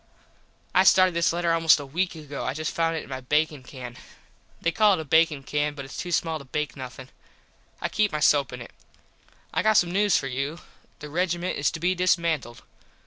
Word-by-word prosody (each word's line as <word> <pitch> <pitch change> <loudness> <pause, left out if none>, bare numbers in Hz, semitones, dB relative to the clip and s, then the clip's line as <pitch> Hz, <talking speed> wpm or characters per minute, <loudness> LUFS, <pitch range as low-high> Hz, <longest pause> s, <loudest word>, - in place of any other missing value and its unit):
I 185 - +5
started 185 -1 +5
this 170 0 +2
letter 170 0 0
almost 165 -2 +5
a 145 - -6
weak 175 +6 -2
ago. 145 -3 -7
I 135 - -2
just 155 0 -3
found 165 0 0
it - - -4
in - - -14
my 130 -1 -5
bakin 150 +2 0
can. 125 -2 -10 0.6
They 170 - 0
call 210 +3 +4
it - - -5
a 160 - -5
bakin 160 -1 +3
can 150 +1 -1
but 140 -1 -7
its 135 - -10
too 175 - -5
small 160 -1 0
to - - -10
bake 150 +3 -3
nothin. 130 -1 -9 0.7
I - - 0
keep 205 +3 +1
my 150 - -2
soap 145 -3 +3
in 125 -1 -7
it. - - -14 0.8
I - - +1
got 215 - +3
some 175 -5 +3
news 205 +2 +3
for - - -3
you. 140 +5 -3 0.4
The 150 - -7
regiment 175 +1 -1
is 145 - +2
to 165 - -6
be 180 +3 +1
dismantled. 170 -9 0
160 Hz, 215 wpm, -25 LUFS, 140-175 Hz, 0.8 s, I